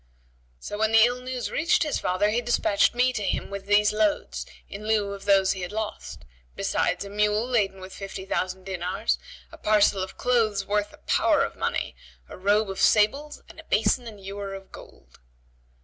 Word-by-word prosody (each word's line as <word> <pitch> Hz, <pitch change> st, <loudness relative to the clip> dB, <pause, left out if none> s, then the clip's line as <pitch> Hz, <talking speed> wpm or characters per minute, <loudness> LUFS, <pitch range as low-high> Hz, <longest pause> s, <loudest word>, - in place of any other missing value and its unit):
So 205 Hz, -, -6 dB
when 220 Hz, 0 st, +1 dB
the 225 Hz, 0 st, +8 dB
ill 245 Hz, +1 st, -1 dB
news 255 Hz, -1 st, -4 dB
reached 330 Hz, +2 st, +2 dB
his 300 Hz, -, -1 dB
father, 185 Hz, +3 st, +1 dB
he 235 Hz, +3 st, +1 dB
despatched 235 Hz, -3 st, +2 dB
me 255 Hz, +1 st, +3 dB
to 210 Hz, -, -3 dB
him 200 Hz, -, -2 dB
with 200 Hz, 0 st, -6 dB
these 205 Hz, 0 st, +4 dB
loads, 210 Hz, -1 st, 0 dB, 0.2 s
in 210 Hz, +2 st, -8 dB
lieu 210 Hz, -2 st, +1 dB
of 200 Hz, -1 st, -9 dB
those 195 Hz, -1 st, +4 dB
he 190 Hz, -, -4 dB
had 180 Hz, -, -5 dB
lost; 215 Hz, -, -5 dB, 0.3 s
besides -, -, -1 dB
a -, -, -8 dB
mule 210 Hz, +2 st, +1 dB
laden 205 Hz, -6 st, 0 dB
with 185 Hz, 0 st, -10 dB
fifty 195 Hz, -1 st, -7 dB
thousand 185 Hz, -1 st, -2 dB
dinars, 185 Hz, 0 st, -2 dB, 0.3 s
a -, -, -13 dB
parcel 210 Hz, -2 st, +3 dB
of 190 Hz, -, -6 dB
clothes 220 Hz, -5 st, +1 dB
worth 205 Hz, +1 st, -1 dB
a -, -, -16 dB
power -, -, +2 dB
of -, -, -4 dB
money, -, -, -2 dB, 0.3 s
a -, -, -10 dB
robe 205 Hz, +2 st, +1 dB
of 190 Hz, -, -7 dB
sables[FN#73] 275 Hz, +8 st, +2 dB
and -, -, -14 dB
a -, -, -10 dB
basin 245 Hz, -2 st, +1 dB
and 215 Hz, -3 st, -10 dB
ewer 200 Hz, 0 st, -5 dB
of 195 Hz, 0 st, -12 dB
gold." -, -, -15 dB
205 Hz, 195 wpm, -25 LUFS, 195-220 Hz, 0.3 s, the